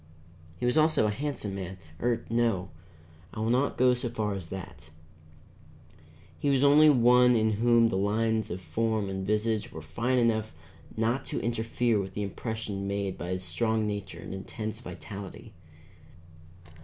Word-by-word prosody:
He - - -1
was 125 +6 +3
also 155 -7 +3
a 105 - +1
handsome 130 -4 -3
man, 95 -1 -5 0.2
or 120 -1 0
no, 115 -5 +1 0.7
I - - -5
will 110 +1 +1
not 130 +3 +1
go 125 0 +5
so 125 0 -3
far 110 -3 -2
as 95 -4 -6
that; 90 -5 -8 1.5
he 145 - 0
was 135 -1 +3
only 150 +2 +7
one 125 -2 +6
in 110 -1 +3
whom 115 +2 +4
the 95 - -1
lines 110 +2 +1
of 90 +2 -5
form 110 +4 -1
and 95 0 -4
visage 105 +1 0
were 80 - -7
fine 115 +12 -1
enough 110 -5 +1 0.4
not 115 +4 +1
to - - -3
interfere 115 -1 0
with 95 -1 -5
the 105 - -2
impression 100 -1 -4
made 100 -1 -2
by 85 - -6
his 90 0 -3
strong 110 +5 0
nature 100 -2 -4
and - - -8
intense 110 +3 -5
vitality. 100 -2 -9
110 Hz, 160 wpm, -28 LUFS, 100-120 Hz, 1.5 s, only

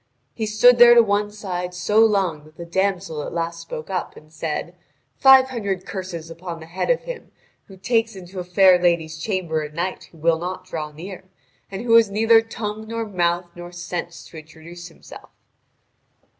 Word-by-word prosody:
He 220 - -3
stood 235 +3 +5
there 240 0 +9
to 235 - +7
one 205 -1 0
side 180 -4 -5
so 210 +4 +1
long 195 -9 +2
that 155 +1 -20
the 170 - -7
damsel 185 -3 -1
at - - -6
last 170 0 -3
spoke 165 +1 -8
up 185 - -3
and 155 +1 -17
said: 160 +2 -4 0.5
"Five 265 -1 +7
hundred 200 -7 -3
curses 175 -4 -6
upon 170 0 -7
the 160 - -10
head 175 - -4
of - - +2
him - - -8 0.4
who 195 - -15
takes 225 +2 0
into 185 0 -9
a - - -3
fair 180 0 +4
lady's 165 -2 0
chamber 170 -4 -2
a 150 0 -6
knight 175 +4 -4
who 165 - -20
will 160 +1 +1
not 180 +2 -5
draw 155 -2 -5
near, 185 +5 -10 0.4
and 195 +3 -6
who 235 -2 +1
has 225 -3 +4
neither 225 +2 +4
tongue 220 -1 -6
nor 230 0 -3
mouth 175 -3 0
nor 175 0 -9
sense 175 -1 -6
to 165 - -12
introduce 160 +3 -12
himself." 165 - -14
180 Hz, 185 wpm, -22 LUFS, 170-210 Hz, 0.5 s, there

